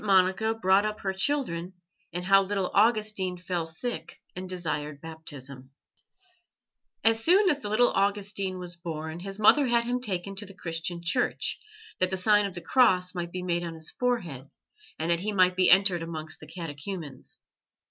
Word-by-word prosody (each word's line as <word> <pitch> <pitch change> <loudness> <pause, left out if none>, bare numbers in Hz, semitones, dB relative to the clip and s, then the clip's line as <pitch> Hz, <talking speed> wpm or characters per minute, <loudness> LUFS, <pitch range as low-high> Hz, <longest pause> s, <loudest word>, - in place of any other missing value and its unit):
MONICA 195 +2 +3
BROUGHT 195 -2 +3
UP 215 0 -3
HER 190 -1 -1
CHILDREN, 190 -6 -1 0.4
AND 175 +2 -4
HOW 195 +1 +6
THE 195 - -4
LITTLE 190 -2 -1
AUGUSTINE 210 -4 +2
FELL 175 -2 -3
SICK 165 0 -5 0.2
AND 185 0 -6
DESIRED 150 -5 -3
BAPTISM 140 -5 -8 1.3
As 225 0 +3
soon 380 +4 +5
as 290 - -1
the 210 - -5
little 240 +3 +4
Augustine 200 -1 0
was 180 -1 -6
born, 160 -1 -6
his 195 +2 -6
mother 260 +6 +5
had 235 -1 +3
him 245 +1 -1
taken 195 -4 -2
to 205 - -3
the 195 - -13
Christian 170 -1 -4
Church, 245 +8 0 0.4
that 185 - +2
the 190 - -1
sign 205 +2 +4
of 190 - -9
the 175 - -6
Cross 180 -4 +3
might 175 -1 -4
be 180 0 -5
made 175 -1 0
on 165 -1 -5
his 160 0 -5
forehead, 180 - -2 0.5
and 165 +2 -1
that 170 - +2
he 210 +4 -2
might 185 -2 +4
be 185 -1 +4
entered 190 -2 +5
amongst 160 -1 -5
the - - -12
catechumens. 165 -2 -7
185 Hz, 180 wpm, -28 LUFS, 170-210 Hz, 1.3 s, HOW